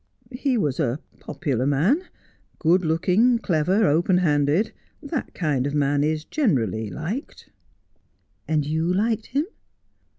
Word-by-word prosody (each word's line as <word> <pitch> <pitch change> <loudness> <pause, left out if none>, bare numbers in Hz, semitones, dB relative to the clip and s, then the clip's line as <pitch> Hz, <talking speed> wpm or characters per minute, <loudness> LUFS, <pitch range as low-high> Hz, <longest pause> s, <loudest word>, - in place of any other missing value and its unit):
' - - -32
He 255 0 0
was 150 - -1
a 135 -2 0 0.2
popular 135 -6 -2
man, 165 - +2 0.6
good 180 +3 +3
looking, 185 +9 +3
clever, 185 +1 +1
open 175 +3 +3
handed. 150 +3 +2 0.3
That 285 -1 -4
kind 145 -6 0
of 145 - -3
man 145 0 +2
is 155 0 -1
generally 115 - 0
liked.' 185 - -6 0.5
' - - -44
And 155 -2 +1
you 160 +3 0
liked 220 +4 0
him 285 +4 0
160 Hz, 135 wpm, -24 LUFS, 145-215 Hz, 0.6 s, good